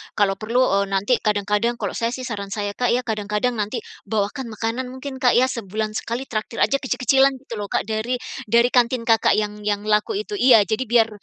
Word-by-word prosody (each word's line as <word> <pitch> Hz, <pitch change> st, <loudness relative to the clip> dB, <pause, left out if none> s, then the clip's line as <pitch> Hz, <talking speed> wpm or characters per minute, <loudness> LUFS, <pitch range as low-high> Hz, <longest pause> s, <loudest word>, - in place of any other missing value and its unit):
kalau 195 Hz, -2 st, +1 dB
perlu, 235 Hz, +4 st, +1 dB, 0.2 s
eee, 200 Hz, -, +1 dB
nanti 195 Hz, +5 st, +1 dB
kadang-kadang 210 Hz, +2 st, 0 dB
kalau -, -, -3 dB
saya 235 Hz, +1 st, -2 dB
sih 255 Hz, -, -7 dB
saran 210 Hz, -5 st, -4 dB
saya, 205 Hz, 0 st, -3 dB
Kak, 245 Hz, +3 st, +1 dB
ya, 250 Hz, -, -1 dB
kadang-kadang 215 Hz, +1 st, -1 dB
nanti 210 Hz, -, -2 dB, 0.2 s
bawakan 220 Hz, +4 st, -2 dB
makanan 230 Hz, +4 st, -2 dB
mungkin, 260 Hz, +1 st, -7 dB
Kak, 250 Hz, -2 st, +3 dB
ya, 255 Hz, +1 st, +4 dB
sebulan 215 Hz, -2 st, -3 dB
sekali 235 Hz, +3 st, -4 dB
traktir 225 Hz, -2 st, -2 dB
aja 275 Hz, -, +2 dB
kecil-kecilan 270 Hz, +1 st, +2 dB
gitu 230 Hz, -4 st, -7 dB
loh, 205 Hz, -, -4 dB
Kak, -, -, -1 dB
dari 220 Hz, +3 st, -2 dB, 0.4 s
dari 235 Hz, +1 st, +5 dB
kantin 245 Hz, 0 st, +2 dB
Kakak 225 Hz, -1 st, +3 dB
yang 210 Hz, 0 st, -2 dB
yang 205 Hz, -1 st, 0 dB
laku 210 Hz, -, +1 dB
itu 415 Hz, 0 st, -4 dB
iya, 245 Hz, -, +6 dB
jadi 220 Hz, +6 st, -1 dB
biar 230 Hz, -1 st, +3 dB
230 Hz, 205 wpm, -22 LUFS, 210-250 Hz, 0.4 s, iya